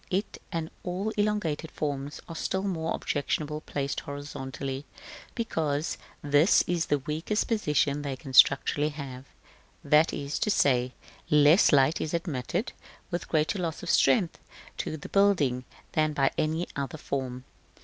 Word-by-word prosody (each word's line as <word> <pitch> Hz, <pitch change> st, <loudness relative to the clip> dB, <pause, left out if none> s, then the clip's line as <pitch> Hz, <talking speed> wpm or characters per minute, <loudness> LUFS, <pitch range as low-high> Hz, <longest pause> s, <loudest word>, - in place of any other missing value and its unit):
It, 195 Hz, +3 st, -2 dB
and 165 Hz, -1 st, -3 dB
all 185 Hz, +4 st, -2 dB
elongated 205 Hz, -8 st, -1 dB
forms, 145 Hz, -2 st, -4 dB
are 165 Hz, -, -7 dB
still 190 Hz, +4 st, -1 dB
more 165 Hz, -5 st, -1 dB
objectionable 150 Hz, +1 st, -2 dB
placed 140 Hz, -3 st, -3 dB
horizontally, 140 Hz, -1 st, -6 dB, 0.5 s
because 160 Hz, -, -1 dB, 0.2 s
this 145 Hz, +4 st, +5 dB
is 175 Hz, -1 st, 0 dB
the 145 Hz, -, +2 dB
weakest 155 Hz, +9 st, -2 dB
position 150 Hz, -, +1 dB
they 140 Hz, -2 st, -3 dB
can 130 Hz, 0 st, -10 dB
structurally 145 Hz, +3 st, +5 dB
have; 135 Hz, -3 st, -8 dB, 0.6 s
that 150 Hz, +2 st, +4 dB
is 140 Hz, 0 st, -3 dB
to -, -, 0 dB
say, 125 Hz, -9 st, +2 dB, 0.4 s
less 150 Hz, +5 st, +6 dB
light 140 Hz, +1 st, +4 dB
is 155 Hz, +2 st, -2 dB
admitted, 170 Hz, -, -2 dB, 0.4 s
with 175 Hz, -, -3 dB
greater 155 Hz, +5 st, +1 dB
loss 165 Hz, -3 st, -3 dB
of -, -, 0 dB
strength 160 Hz, +5 st, +3 dB, 0.4 s
to 155 Hz, -, -3 dB
the 145 Hz, -, -9 dB
building, 155 Hz, -11 st, +3 dB, 0.3 s
than 155 Hz, -1 st, +1 dB
by 135 Hz, -2 st, +2 dB
any 160 Hz, +3 st, 0 dB
other 140 Hz, +1 st, -3 dB
form. 130 Hz, -3 st, -4 dB
150 Hz, 140 wpm, -28 LUFS, 140-170 Hz, 0.6 s, less